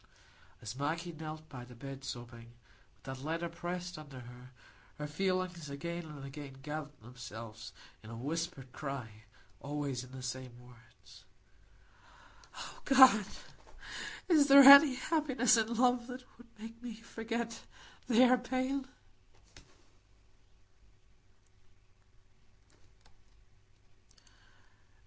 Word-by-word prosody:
As 110 +2 -6
Maggie 165 +5 -2
knelt 155 -1 -8
by 125 -4 -9
the 125 0 -13
bed 135 +2 -8
sobbing, 120 -2 -8 0.4
with - - -34
that 135 -1 -7
letter 165 +3 -2
pressed 175 0 -5
under 140 -4 -10
her, 125 +1 -12 0.5
her 150 - -4
feelings 180 0 -2
again 170 +4 -5
and 150 -3 -9
again 140 0 -8
gathered 150 -1 -6
themselves 115 -2 -9 0.3
in 110 - -12
a 115 - -7
whispered 145 0 -4
cry, 120 -7 -6 0.3
always 140 -3 -3
in 130 - -13
the 130 -1 -9
same 125 -1 -6
words,— 120 -1 -18 1.3
"O - - -9
God, 260 -7 +7 1.0
is 305 -5 +5
there 280 0 +10
any 280 0 +11
happiness 270 -4 +2
in 225 0 +1
love 245 0 +2
that 255 0 -8
could 240 - -17
make 225 +2 -10
me 240 -3 -7
forget 230 +1 -5 0.5
their 250 +1 +5
pain?" 260 +2 -2
155 Hz, 105 wpm, -33 LUFS, -, 1.3 s, any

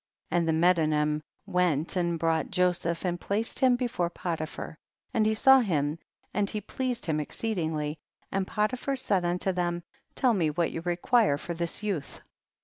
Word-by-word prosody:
And 170 -1 +2
the - - +3
Medanim 155 -3 +2 0.2
went 180 -5 +1
and 170 -2 +1
brought 165 0 0
Joseph 175 -1 0
and 175 -1 -1
placed 215 +3 -2
him 255 -2 +5
be 250 +1 -1
fore 180 -8 -1
Potiphar, 165 -3 -5 0.3
and 215 -1 +3
he 220 - +2
saw 265 +4 +7
him, 155 - 0 0.3
and 205 -1 +1
he 215 - -3
pleased 250 +4 -3
him 155 -2 0
exceedingly, 155 -4 -2 0.3
and 190 -1 -1
Potiphar 245 +6 -1
said 205 -8 +1
unto 180 +2 0
them, 175 -1 -1 0.3
tell 250 -3 +3
me 170 -7 +2
what 165 +2 0
you 165 - -4
require 175 - +2
for 170 - -5
this 170 +4 -2
youth 190 -9 -3
175 Hz, 165 wpm, -28 LUFS, 160-210 Hz, 0.3 s, saw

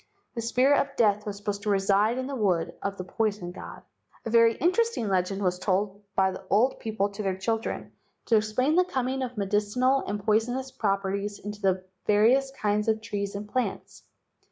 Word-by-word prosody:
The 230 - -3
spirit 255 +5 +3
of 275 0 -6
death 210 -2 +2
was 200 -1 -4
supposed 205 0 -4
to 210 - -3
reside 200 +3 +2
in 260 - -2
the 275 +1 -4
wood 180 -7 0
of 200 0 -3
the 185 - -4
poison 200 -2 -2
god. - - -10 0.4
A 225 - -3
very 230 -1 +5
interesting 370 - +1
legend 195 +1 0
was 180 -1 0
told 200 +1 -1
by 190 0 +3
the 185 - -8
old 240 +6 +3
people 215 -2 -1
to 200 +1 -7
their 190 -2 -1
children 225 +3 -3 0.3
to 230 - +3
explain 220 +7 +2
the 365 +2 +5
coming 265 -5 -2
of 250 -2 -4
medicinal 210 +7 +1
and 205 +1 -2
poisonous 245 +5 +1
properties 200 -3 -1
into 210 0 -8
the 190 -1 +1 0.2
various 235 +6 +4
kinds 210 -5 -1
of 220 0 +2
trees 200 -2 -4
and 205 +1 -5
plants. 250 +4 -3
210 Hz, 185 wpm, -27 LUFS, 200-245 Hz, 0.4 s, very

